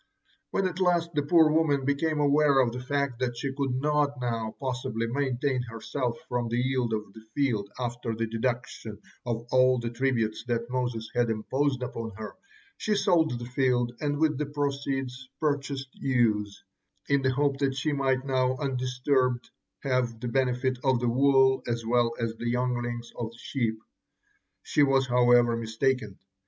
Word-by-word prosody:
When 195 - 0
at 180 -1 -2
last 175 -2 +2
the 150 - +1
poor 160 +1 +5
woman 150 -4 +2
became 150 +2 0
aware 145 -1 +4
of 125 -3 +3
the 125 - -5
fact 135 -1 -1
that 120 -2 -1
she 135 +1 -3
could 135 -2 -1
not 145 -1 +1
now 115 -3 -2
possibly 125 -4 -2
maintain 130 +1 0
herself 120 +1 -3
from 120 -1 -1
the 120 - -1
yield 125 -1 0
of 105 -2 -3
the 110 - -12
field 115 -8 0
after 120 -2 -3
the 115 +1 -1
deduction 115 -1 -3 0.3
of 115 -1 -2
all 130 0 +5
the 120 -1 -3
tributes 120 -3 0
that 120 0 -2
Moses 120 -3 -2
had 120 -1 +2
imposed 130 +4 0
upon 115 -3 -5
her, 110 0 -7 0.4
she 215 - 0
sold 175 -9 +2
the 120 - -6
field 125 -1 +1
and 145 -1 -1
with 155 -2 +1
the 150 - -1
proceeds 135 -3 -3
purchased 140 -3 -1
ewes, 105 -6 0 0.4
in 140 -1 +3
the 130 0 +1
hope 140 0 +1
that 135 -2 +1
she 145 +3 -1
might 135 -1 +1
now 130 -1 +1
undisturbed 125 -2 0 0.3
have 125 -4 0
the 120 - -3
benefit 130 0 0
of 130 -3 +3
the 120 0 +1
wool 135 +1 +4
as 115 -1 -2
well 120 0 +2
as 115 -1 -1
the 120 - -2
younglings 120 -1 -2
of 115 -2 -2
the 115 - -16
sheep. 115 -3 -2 0.9
She - - +1
was, 135 -2 +4
however, 120 -1 +4
mistaken. 115 -2 -1
130 Hz, 170 wpm, -28 LUFS, 120-140 Hz, 0.9 s, poor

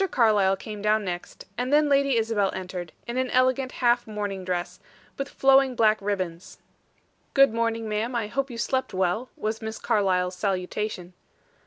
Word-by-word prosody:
Carlyle 205 -5 +3
came 210 +1 -8
down 210 0 +2
next; 175 -1 -6
and 250 +2 -1
then 300 +1 +4
Lady 275 -3 +3
Isabel 220 -3 +1
entered, 180 -2 -6
in 235 +1 -4
an 260 0 0
elegant 255 +1 +2
half 240 -1 +2
mourning 205 -3 -4
dress, 180 0 -3 0.4
with 275 0 -4
flowing 270 -1 +4
black 215 -2 +3
ribbons. 185 -3 -4 0.8
"Good 275 -4 +6
morning, 230 -1 -1
ma'am. 215 +4 -2
I 235 -2 0
hope 275 +6 -2
you 240 - -7
slept 260 -1 -1
well," 190 +7 0
was 220 +1 -3
Miss 220 0 -5
Carlyle's 185 -3 +1
salutation. 185 -1 -3
215 Hz, 160 wpm, -25 LUFS, 190-250 Hz, 0.8 s, Good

